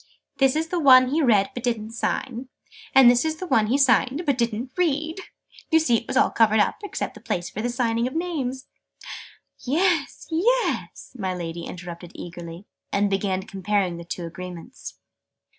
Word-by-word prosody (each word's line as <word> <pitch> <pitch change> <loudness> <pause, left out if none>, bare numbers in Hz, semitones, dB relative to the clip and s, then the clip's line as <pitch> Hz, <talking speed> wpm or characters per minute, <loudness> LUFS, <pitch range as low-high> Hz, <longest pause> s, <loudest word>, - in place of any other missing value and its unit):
"This 270 0 +3
is 320 +1 -1
the 355 - -1
one 255 -4 +7
he 310 +4 +1
read 210 -8 +3
but 245 - -5
didn't 225 -2 -2
sign: 245 +2 -3 0.5
and 265 -2 +8
this 245 0 +5
is 315 0 -1
the 370 - -6
one 220 -11 +2
he 255 +5 +2
signed 270 - +3
but 280 -3 +2
didn't 235 +1 -2
read! 320 -1 0 0.5
You 320 - +5
see 260 -8 +3
it - - -7
was - - -1
all - - +4
covered 220 -1 +3
up, 205 - +2
except 410 - -4
the - - -13
place 175 -1 -3
for 220 +4 -3
signing 235 -1 0
the - - 0
names 270 -5 -3 0.5
" - - -17 0.2
"Yes, 350 -6 0
yes!" 465 - 0
my 190 -6 -3
Lady 170 -1 -5
interrupted 175 -1 -9
eagerly, 170 +1 -9 0.3
and 200 0 +1
began 195 -1 -1
comparing 195 -2 -1
the 170 - -8
two 170 +1 -6
Agreements. 180 +6 -9
240 Hz, 175 wpm, -24 LUFS, 195-280 Hz, 0.5 s, and